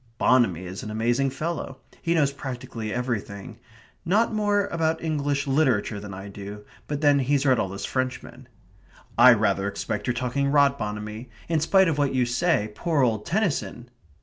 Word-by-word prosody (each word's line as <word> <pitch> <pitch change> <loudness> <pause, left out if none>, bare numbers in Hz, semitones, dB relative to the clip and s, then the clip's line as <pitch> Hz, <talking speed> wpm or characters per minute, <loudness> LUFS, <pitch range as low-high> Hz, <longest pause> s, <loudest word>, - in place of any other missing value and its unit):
("Bonamy 115 -11 +3
is 90 +2 -7
an 110 - -7
amazing 120 +5 +1
fellow. 145 0 -4 0.2
He 170 0 0
knows 145 -4 +3
practically 125 -5 -6
everything 115 -2 -4 0.4
not 215 +7 +2
more 205 -1 +1
about 160 -2 0
English 145 -3 -1
literature 135 -7 +1
than 100 0 -8
I 95 +1 -8
do 100 +1 -9 0.2
but 145 0 -3
then 145 -2 +4
he's 140 +1 +1
read 130 -3 +4
all 95 - -1
those 100 +1 -5
Frenchmen.") 130 -1 -4 0.7
"I 125 +2 +8
rather 100 -2 +1
suspect 105 0 -3
you're 125 - 0
talking 125 +3 -1
rot, 140 -1 +3
Bonamy. 105 +2 -5 0.2
In 165 -1 +1
spite 190 +4 +4
of 155 -3 0
what 140 -2 +1
you 125 -1 +3
say, 125 -4 +1
poor 155 +4 0
old 110 -4 0
Tennyson...." 165 - -2
130 Hz, 170 wpm, -25 LUFS, 110-145 Hz, 0.7 s, I